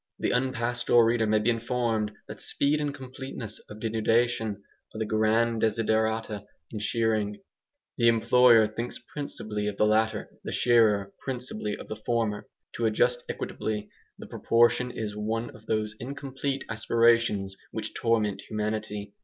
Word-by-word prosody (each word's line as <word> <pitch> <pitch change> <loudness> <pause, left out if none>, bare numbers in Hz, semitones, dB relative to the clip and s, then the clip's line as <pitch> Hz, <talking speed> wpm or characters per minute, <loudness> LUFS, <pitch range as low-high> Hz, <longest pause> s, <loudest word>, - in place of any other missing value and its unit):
The - - 0
unpastoral 120 -1 +2
reader 115 -1 +2
may 110 0 +3
be 110 +3 +2
informed 115 -2 -1 0.2
that - - -7
speed 150 +2 +1
and 145 -1 -1
completeness 130 -5 -7
of 105 - -9
denudation 110 -1 +1 0.3
are - - -5
the 110 - -1
grand 110 +2 +2
desiderata 110 -1 0 0.3
in 110 - -4
shearing; 105 -1 0 0.6
the 115 - +5
employer 115 0 +6
thinks 115 +3 -4
principally 110 -6 -5
of 105 -1 -3
the - - +4
latter, 110 +1 +1
the - - -4
shearer 105 -5 +3
principally 125 -5 -4
of - - -10
the 110 - -5
former. 115 -3 -1 0.3
To 115 - +2
adjust 120 +3 +2
equitably 105 -1 -4 0.3
the - - -9
proportion 120 +2 +2
is 110 -3 -5
one 110 +2 -2
of 110 0 -16
those 110 -1 0
incomplete 135 +1 -4
aspirations 115 -3 +2
which - - -5
torment 105 -4 +1
humanity. 105 -1 -3
110 Hz, 140 wpm, -27 LUFS, 105-120 Hz, 0.6 s, employer